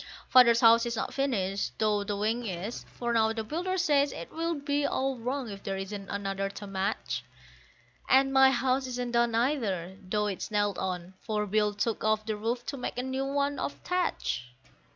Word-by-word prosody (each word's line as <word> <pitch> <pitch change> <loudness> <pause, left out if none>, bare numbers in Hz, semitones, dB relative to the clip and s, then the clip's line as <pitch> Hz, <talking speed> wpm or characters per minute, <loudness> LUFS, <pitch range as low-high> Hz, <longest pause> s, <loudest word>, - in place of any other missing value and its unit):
Father's 235 -2 +7
house 230 0 +7
is 235 - -2
not - - -3
finished, 200 -8 -1
though 210 -2 +2
the 205 0 -3
wing 220 +4 0
is; 190 +5 -5
for 240 -1 -1
now 220 -1 +3
the 225 -1 -3
builder 350 +10 -2
says 290 -5 +3
it - - -8
will 330 +1 -1
be 285 0 -1
all 270 -1 0
wrong 255 +2 -2
if 195 0 -8
there 195 -1 -3
isn't 195 +1 -6
another 195 -1 -2
to 200 +1 -8
match; 195 +1 -2 0.9
And 270 +1 +5
my 265 0 +7
house 260 +1 +1
isn't 245 -1 -3
done 235 -1 +2
either, 205 - 0
though 210 +3 -1
it's 200 -3 -3
nailed 205 -2 0
on, 185 -1 -3
for 210 -2 -1
Bill 210 0 +1
took 220 +2 -1
off 215 0 +1
the 220 -1 -1
roof 230 +3 -2
to 280 - -4
make 250 - -4
a 250 - -1
new 260 +1 -2
one 280 0 0
of 285 - -2
thatch. 360 - -1
230 Hz, 195 wpm, -29 LUFS, 205-265 Hz, 0.9 s, Father's